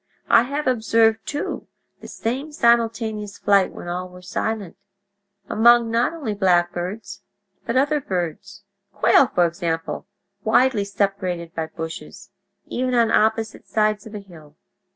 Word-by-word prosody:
I -, -, +8 dB
have 295 Hz, +2 st, -2 dB
observed, 225 Hz, -2 st, +2 dB
too, 290 Hz, 0 st, -4 dB, 0.3 s
the -, -, -11 dB
same 265 Hz, +7 st, -4 dB
simultaneous 225 Hz, -6 st, +1 dB
flight 200 Hz, -2 st, +3 dB
when -, -, -9 dB
all 180 Hz, +1 st, -4 dB
were 180 Hz, 0 st, -14 dB
silent, 200 Hz, 0 st, -3 dB, 0.7 s
among 235 Hz, +1 st, +5 dB
not 230 Hz, +1 st, +2 dB
only 295 Hz, -10 st, -4 dB
blackbirds, 180 Hz, +1 st, 0 dB, 0.5 s
but 235 Hz, +2 st, 0 dB
other 290 Hz, +2 st, +2 dB
birds—quail, 200 Hz, -, 0 dB
for 175 Hz, -5 st, +2 dB
example, 165 Hz, -1 st, -3 dB, 0.4 s
widely 220 Hz, -1 st, +3 dB
separated 190 Hz, -4 st, -2 dB
by 160 Hz, -1 st, -3 dB
bushes—even 170 Hz, +9 st, -6 dB
on 230 Hz, -2 st, +3 dB
opposite 220 Hz, 0 st, +1 dB
sides 215 Hz, -1 st, 0 dB
of 215 Hz, -, -10 dB
a -, -, -4 dB
hill. 160 Hz, -7 st, -15 dB
210 Hz, 125 wpm, -22 LUFS, 180-230 Hz, 0.7 s, I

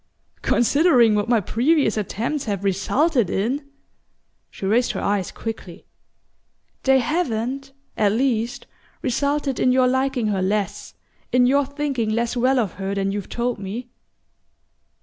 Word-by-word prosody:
"Considering 245 Hz, -2 st, +4 dB
what 210 Hz, +2 st, 0 dB
my 235 Hz, -2 st, +4 dB
previous 245 Hz, -, +1 dB
attempts 225 Hz, +7 st, -2 dB
have 200 Hz, -3 st, -3 dB
resulted 225 Hz, -, +1 dB
in 265 Hz, +10 st, -2 dB, 0.4 s
!" -, -, -47 dB
She -, -, -7 dB
raised 235 Hz, +5 st, +2 dB
her -, -, -3 dB
eyes 200 Hz, -2 st, 0 dB
quickly. 220 Hz, -6 st, -7 dB, 1.0 s
"They 265 Hz, 0 st, +4 dB
haven't, 270 Hz, -2 st, -1 dB, 0.2 s
at 205 Hz, -2 st, +2 dB
least, 235 Hz, 0 st, 0 dB, 0.4 s
resulted 280 Hz, +1 st, 0 dB
in 255 Hz, -, +3 dB
your 255 Hz, 0 st, +4 dB
liking 260 Hz, -1 st, 0 dB
her 195 Hz, -2 st, 0 dB
less, 200 Hz, +1 st, -2 dB, 0.4 s
in 250 Hz, 0 st, +4 dB
your 275 Hz, +2 st, +3 dB
thinking 280 Hz, -5 st, -2 dB
less 235 Hz, +2 st, 0 dB
well 255 Hz, +2 st, +2 dB
of 220 Hz, -7 st, +1 dB
her 195 Hz, +1 st, -2 dB
than 195 Hz, 0 st, 0 dB
you've 200 Hz, -1 st, -5 dB
told 240 Hz, -1 st, -2 dB
me?" 215 Hz, +6 st, -6 dB
240 Hz, 140 wpm, -22 LUFS, 210-270 Hz, 1.0 s, Considering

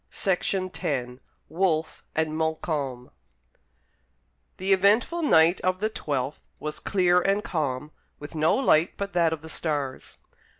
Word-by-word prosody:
Herrick 185 Hz, 0 st, 0 dB, 0.7 s
WOLFE 165 Hz, -3 st, -1 dB
AND 155 Hz, -1 st, 0 dB
MONTCALM 155 Hz, -5 st, -2 dB, 1.5 s
The 190 Hz, +1 st, +2 dB
eventful 210 Hz, -, +3 dB
night 170 Hz, -, +4 dB
of 185 Hz, 0 st, +1 dB
the 215 Hz, +3 st, -1 dB
twelfth 140 Hz, -6 st, -3 dB
was 150 Hz, 0 st, -5 dB
clear 180 Hz, -2 st, +3 dB
and 200 Hz, +2 st, +1 dB
calm, 150 Hz, -3 st, -2 dB, 0.3 s
with 145 Hz, +2 st, -9 dB
no 155 Hz, 0 st, +2 dB
light 170 Hz, -11 st, +3 dB
but 200 Hz, 0 st, -4 dB
that 170 Hz, -2 st, +3 dB
of 160 Hz, -1 st, -4 dB
the -, -, -8 dB
stars. 145 Hz, -5 st, -3 dB
160 Hz, 125 wpm, -26 LUFS, 150-190 Hz, 1.5 s, night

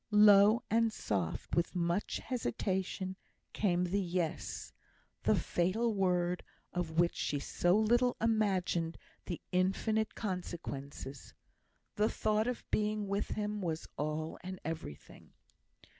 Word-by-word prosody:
Low 210 Hz, +2 st, +7 dB
and 225 Hz, 0 st, +4 dB
soft, 95 Hz, -, -2 dB
with 170 Hz, +2 st, +1 dB
much 175 Hz, +3 st, 0 dB
hesitation, 190 Hz, -6 st, -2 dB, 0.4 s
came 180 Hz, -4 st, +2 dB
the 185 Hz, +3 st, +1 dB
"Yes;" 175 Hz, -3 st, -2 dB, 0.5 s
the -, -, +3 dB
fatal 215 Hz, +7 st, +1 dB
word 180 Hz, -2 st, +1 dB, 0.3 s
of 170 Hz, -2 st, -2 dB
which 175 Hz, 0 st, +4 dB
she 145 Hz, -, -1 dB
so 175 Hz, +6 st, +2 dB
little 240 Hz, +3 st, +3 dB
imagined 190 Hz, -7 st, +1 dB, 0.3 s
the 175 Hz, -, -3 dB
infinite 195 Hz, +4 st, +1 dB
consequences. 145 Hz, -, -5 dB, 0.6 s
The 210 Hz, +1 st, +3 dB
thought 215 Hz, +1 st, +1 dB
of 250 Hz, -1 st, -3 dB
being 210 Hz, -1 st, +1 dB
with 200 Hz, +1 st, 0 dB
him 210 Hz, 0 st, -2 dB
was 165 Hz, -3 st, -2 dB
all 155 Hz, +2 st, -3 dB
and 185 Hz, 0 st, -6 dB
everything. 160 Hz, -, -7 dB
185 Hz, 115 wpm, -33 LUFS, 170-215 Hz, 0.6 s, Low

